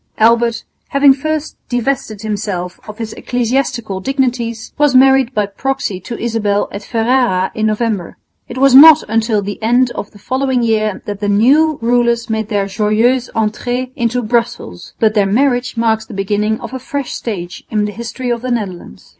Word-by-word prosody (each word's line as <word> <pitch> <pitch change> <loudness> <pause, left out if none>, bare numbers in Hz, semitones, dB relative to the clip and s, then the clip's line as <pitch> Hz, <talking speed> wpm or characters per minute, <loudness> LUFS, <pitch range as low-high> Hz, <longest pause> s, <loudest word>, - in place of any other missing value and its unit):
Albert, 235 +1 +3 0.2
having 280 0 +5
first 310 +2 -3
divested 245 -4 -2
himself 200 -4 -4
of 215 - -8
his 225 -2 -5
ecclesiastical 240 -4 -2
dignities, 240 -2 -2
was 295 -3 +2
married 265 -1 +5
by 210 -1 +2
proxy 250 0 -3
to 230 +6 -7
Isabel 215 -3 -1
at 200 - -6
Ferrara 225 -4 +1
in 220 0 0
November. 215 -4 -2 0.3
It 245 - -8
was 275 0 +4
not 315 +3 +9
until 220 -1 0
the 205 +2 -6
end 240 +3 +2
of 205 - -6
the - - -17
following 260 +2 -1
year 215 -3 0
that 205 -1 -5
the 205 -1 -1
new 280 +9 +3
rulers 235 -1 +1
made 220 -1 -2
their 205 -3 0
joyeuse 220 +5 +1
entrée 245 +4 -2
into 240 +1 -1
Brussels, 230 - -3
but 220 -1 +3
their 205 -2 +2
marriage 245 +3 +1
marks 220 -1 0
the 220 - -9
beginning 210 +2 -1
of - - -8
a 260 - -4
fresh 280 0 -4
stage 180 -6 -6
in 210 -1 0
the 210 - -3
history 235 +3 -5
of 235 -1 -2
the 255 - -4
Netherlands. 195 - -5
230 Hz, 170 wpm, -15 LUFS, 210-255 Hz, 0.3 s, not